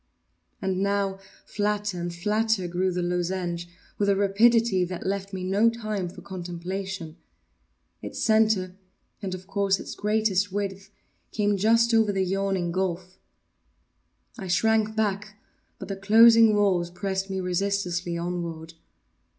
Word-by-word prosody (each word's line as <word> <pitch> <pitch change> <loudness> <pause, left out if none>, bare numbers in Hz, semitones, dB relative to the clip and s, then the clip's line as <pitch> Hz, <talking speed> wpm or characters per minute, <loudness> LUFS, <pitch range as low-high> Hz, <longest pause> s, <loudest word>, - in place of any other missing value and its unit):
And 190 0 -1
now, 200 -1 0 0.3
flatter 205 -3 -2
and 175 0 -3
flatter 210 +2 0
grew 180 +2 0
the 180 0 -2
lozenge, 175 -1 -2 0.3
with 200 -1 +2
a 200 - +4
rapidity 205 0 +3
that 180 0 -5
left 195 0 -2
me 190 -2 -5
no 200 +5 +3
time 215 -5 -4
for - - -12
contemplation. 180 -1 -6 0.8
Its - - -7
centre, 215 -4 +2 0.5
and 190 -2 -3
of 185 0 -11
course, 195 0 0
its - - -7
greatest 205 -2 0
width, 195 -1 -4 0.4
came 205 -1 +1
just 230 +4 +3
over 220 -2 +4
the 190 -1 0
yawning 190 -2 -1
gulf. 185 0 -3 1.2
I 190 - -6
shrank 220 +4 +2
back—but 210 -1 -5
the 195 - -4
closing 225 +2 +6
walls 185 -4 +2
pressed 190 +2 -3
me 190 0 -2
resistlessly 180 -1 -1
onward. 170 -1 -5
195 Hz, 130 wpm, -26 LUFS, 180-210 Hz, 1.2 s, closing